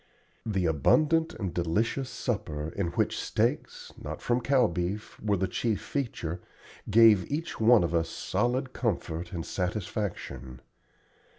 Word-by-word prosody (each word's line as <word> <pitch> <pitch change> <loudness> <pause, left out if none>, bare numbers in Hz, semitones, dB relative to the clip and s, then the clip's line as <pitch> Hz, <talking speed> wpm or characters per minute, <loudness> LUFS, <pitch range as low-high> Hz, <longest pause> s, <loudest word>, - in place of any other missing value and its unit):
The 95 -4 0
abundant 155 - +3
and 95 -6 -4
delicious 105 +10 0
supper, 80 -10 -3
in 95 +1 -2
which - - 0
steaks, - - -1
not - - -5
from 120 +1 0
cow 135 -1 +4
beef, 90 +3 -3
were 105 -2 +1
the 95 +1 0
chief 110 +3 -1
feature, 90 - -3 0.5
gave 110 -2 +6
each 160 +3 -3
one 115 -2 +6
of 85 0 -1
us 85 -1 +1
solid 130 +2 -1
comfort 90 -7 -2
and 85 -4 -4
satisfaction. 90 - -4
100 Hz, 130 wpm, -28 LUFS, 85-120 Hz, 0.5 s, gave